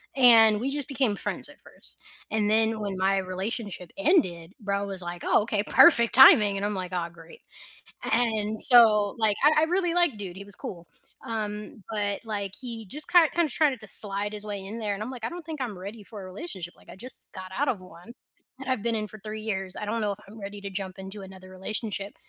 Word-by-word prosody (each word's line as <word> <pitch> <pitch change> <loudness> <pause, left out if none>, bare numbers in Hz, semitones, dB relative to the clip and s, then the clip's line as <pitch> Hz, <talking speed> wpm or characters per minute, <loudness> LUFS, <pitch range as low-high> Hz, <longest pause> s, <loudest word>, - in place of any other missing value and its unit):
and 225 -5 +7
we 255 +5 -2
just 290 -1 -3
became 255 -6 +1
friends - - -1
at - - -14
1st - - -5 0.3
and 210 -1 +1
then 220 0 +2
when 200 -2 -4
my 195 +1 +2
relationship 190 -1 -4
ended, 190 - +1
bro 200 -1 -1
was 195 -2 -4
like, 175 0 -7
"Oh, - - +4
okay, 210 -2 -1
perfect 235 -7 +6
timing," 215 -6 +8
and 200 - -2
I'm 210 - -1
like, 185 -1 -5
"Oh, 170 -2 -2
great," 165 -1 -16 0.7
and 220 -2 0
so 220 -5 +6
like 215 -2 +2
I 305 +1 +5
I - - +3
really 350 0 0
like 345 -11 +2
dude, 190 -3 -7
he 200 - -7
was 200 0 -6
cool, 170 -2 -8 0.4
um, 210 -1 -5
but 205 -2 -2
like, 200 -3 -4
he 230 -4 -7
just 300 +10 +3
kind 345 -3 +6
kinda 340 -3 +1
tried 280 -2 +1
to 215 - -7
slide 205 +1 +1
his 210 0 -2
way 200 -2 -5
in 215 +4 -7
there, 210 -2 -2
and 195 - -8
I'm 240 - -6
like, 245 -4 -7
"I - - -2
don't 345 -2 -9
think 315 -4 -6
I'm 220 -7 -4
ready 205 +3 -8
for 205 0 -10
a - - -9
relationship, 185 - -7
like, - - -22
I - - -10
just 250 +7 -7
got 185 -1 -8
out 290 - +1
of 220 - -1
one 180 +5 -14 0.5
that 270 0 -9
I've 255 -5 -1
been 235 0 0
in 215 -1 -2
for 215 - -11
3 215 +2 -7
years. 195 -4 -4
I - - -5
don't 225 +2 -2
know 210 -2 0
if 200 - -9
I'm 215 +2 -12
ready 200 0 -7
to 200 - -5
jump 190 -1 -6
into 190 +2 -8
another 190 -1 -12
relationship," 200 +1 -5
210 Hz, 230 wpm, -26 LUFS, 195-235 Hz, 0.7 s, timing